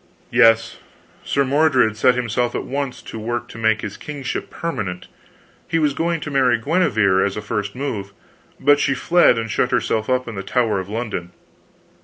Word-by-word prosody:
"Yes. 115 -2 +4 0.4
Sir 140 -1 +1
Mordred 135 -5 +3
set 125 +3 +3
himself 120 0 -1
at - - -2
once 140 -2 -4
to 110 - -8
work 120 +2 -3
to 115 - -10
make 110 -1 +2
his 105 - -6
kingship 145 -3 -5
permanent. 100 - -4 0.6
He 165 - 0
was 150 -3 +2
going 165 +1 -1
to 150 - -5
marry 130 -4 +3
Guenever, 110 - +2
as 100 0 -2
a - - -1
first 100 -1 -3
move; 110 -8 -4 0.5
but 145 +1 +4
she 140 -2 +1
fled 175 +2 +4
and 115 -1 -3
shut - - +1
herself 110 +1 0
up 130 0 +1
in 115 - -5
the 95 - -4
Tower 110 0 0
of 95 +1 -6
London. 105 -6 -4
120 Hz, 180 wpm, -20 LUFS, 105-140 Hz, 0.6 s, Yes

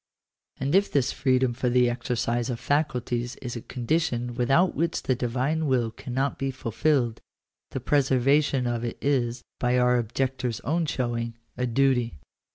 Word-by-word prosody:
And 135 +3 -1
if 195 +2 +3
this 135 -4 +2
freedom 130 -2 +2
for 125 +1 -1
the 125 0 +4
exercise 120 0 -1
of 120 -2 -3
faculties 125 -5 -1
is 125 -2 -6
a 115 - -5
condition 125 -2 -1
without 135 +9 +3
which 165 +1 -1
the 130 - +2
Divine 130 +6 -1
will 120 -4 +1
cannot 130 +4 -3
be 135 - -1
fulfilled, 130 0 0 0.5
the - - -4
preserva 135 +2 +3
tion 135 -3 -1
of 120 -1 -1
it 120 - -3
is, 125 -4 0 0.2
by 125 0 +2
our 125 0 +4
objectors 125 +1 -2
own 160 +4 0
showing, 120 -3 -2 0.2
a 125 - -1
duty. 125 -3 +2
125 Hz, 160 wpm, -26 LUFS, 120-135 Hz, 0.5 s, the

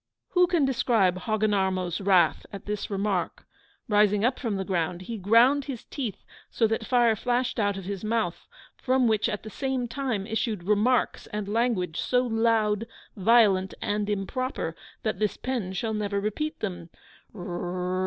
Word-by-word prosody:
Who 360 -1 +4
can 340 -5 +2
describe 235 -8 +2
Hogginarmo's 190 -3 0
wrath 185 -5 +3
at 200 -2 -8
this 210 0 -3
remark? 195 -3 -2 0.4
Rising 210 0 +3
up 255 +1 +1
from 230 -6 -2
the 190 0 -3
ground, 180 -1 -1
he 225 +3 -6
ground 240 +8 +4
his 265 -5 -6
teeth 245 -9 -5 0.3
so 230 - +1
that 220 0 -1
fire 240 -3 +4
flashed 245 +2 -1
out 205 -2 +1
of 195 - -7
his 195 0 -5
mouth, 215 -5 -1 0.3
from 260 -1 +2
which 220 0 +2
at 210 -2 -4
the 215 - -8
same 265 -1 -2
time 235 -5 -2
issued 220 -3 -2
remarks 215 +6 +1
and 210 -1 -4
language, 210 -6 0
so 250 0 +1
LOUD, 225 -2 +1 0.3
VIOLENT, 195 -3 +4
AND 205 0 -1
IMPROPER, 205 -3 -2 0.3
that 215 -4 -1
this 210 -1 0
pen 245 -8 -3
shall 220 +4 -2
never 205 -1 -1
repeat 215 +10 -3
them! 175 -5 -4
215 Hz, 155 wpm, -26 LUFS, 195-240 Hz, 0.4 s, Who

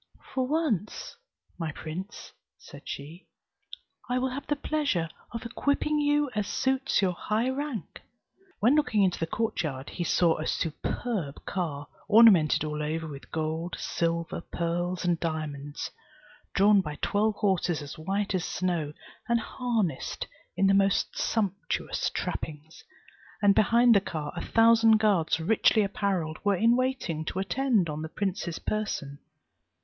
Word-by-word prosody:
"For 260 -1 0
once, 275 - -1 0.4
my 165 -2 -2
prince," 175 +8 -7 0.3
said - - -13
she, 155 +6 -8 0.8
"I 250 - +1
will 260 +1 0
have 280 +2 -6
the 295 - +1
pleasure 285 - 0 0.2
of 230 0 -6
equipping 285 +5 0
you 290 0 +2
as 210 -2 -1
suits 265 -4 +1
your 185 - +3
high 220 +7 0
rank;" 270 - -5 0.6
when 235 +6 +4
looking 250 -9 +3
into 185 -2 +1
the 165 - -1
court 225 +2 -1
yard, 135 -4 -4
he 175 - -3
saw 170 0 +3
a 155 - -3
superb 165 - -3
car, 145 -6 -3 0.2
ornamented 205 -9 +6
all 150 0 -3
over 160 +2 -2
with 140 -3 -9
gold, 160 +2 -2
silver, 170 0 -2
pearls 175 +2 -1
and 175 -2 +2
diamonds, 150 -3 -4 0.6
drawn 200 0 +6
by 150 -4 -5
twelve 210 +1 +2
horses 185 -6 0
as 145 - -8
white 195 +5 -1
as 185 -3 0
snow, 170 -6 -1 0.4
and 235 0 +3
harnessed 225 - -2 0.3
in 195 - +3
the 195 - +5
most 195 -1 +2
sumptuous 200 -5 -1
trappings; 155 +1 -5 0.6
and 205 -2 +5
behind 235 +4 +5
the 200 - +5
car 155 -6 -5
a 170 - -4
thousand 225 -1 +5
guards 200 -8 +2
richly 215 +4 +3
apparelled 190 -5 -1
were 205 -1 +3
in 230 +5 +4
waiting 255 -11 -1
to 170 - -5
attend 200 +1 +1
on 150 0 -4
the 160 - -5
prince's 185 -3 -3
person. 150 -10 -3
195 Hz, 145 wpm, -28 LUFS, 160-230 Hz, 0.8 s, ornamented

